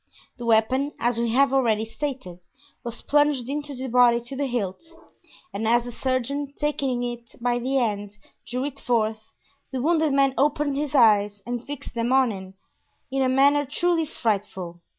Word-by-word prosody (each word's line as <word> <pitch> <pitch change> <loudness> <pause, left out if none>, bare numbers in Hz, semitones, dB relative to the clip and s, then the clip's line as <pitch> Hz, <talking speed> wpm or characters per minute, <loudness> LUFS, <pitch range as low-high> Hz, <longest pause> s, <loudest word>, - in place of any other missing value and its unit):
The 240 - -5
weapon, 255 +6 +2
as 240 -1 +1
we 235 0 0
have 275 +1 +4
already 225 -5 +2
stated, 235 -7 -5 0.4
was 235 -1 -5
plunged 290 -4 +2
into 290 0 -4
the 260 +1 -5
body 245 -1 +5
to 240 +3 -7
the 280 +1 -1
hilt, 230 - -3 0.7
and 220 +2 -2
as 235 +1 +3
the 245 - -7
surgeon, 265 +3 -2
taking 270 -4 -1
it 240 -1 -6
by 245 0 0
the 265 +3 0
end, 205 -4 -2 0.3
drew 250 +2 -2
it 280 -1 -6
forth, 220 -2 -1 0.4
the 265 - -3
wounded 315 +2 +2
man 275 -1 +3
opened 290 0 +1
his 295 0 -2
eyes 205 -4 +4
and 240 0 -4
fixed 290 -1 -7
them 235 +1 -1
on 260 -2 +4
him 190 -1 -9 0.6
in 270 0 0
a 260 - +2
manner 280 +2 +4
truly 325 +3 0
frightful. 195 -8 -3
250 Hz, 170 wpm, -24 LUFS, 225-280 Hz, 0.7 s, body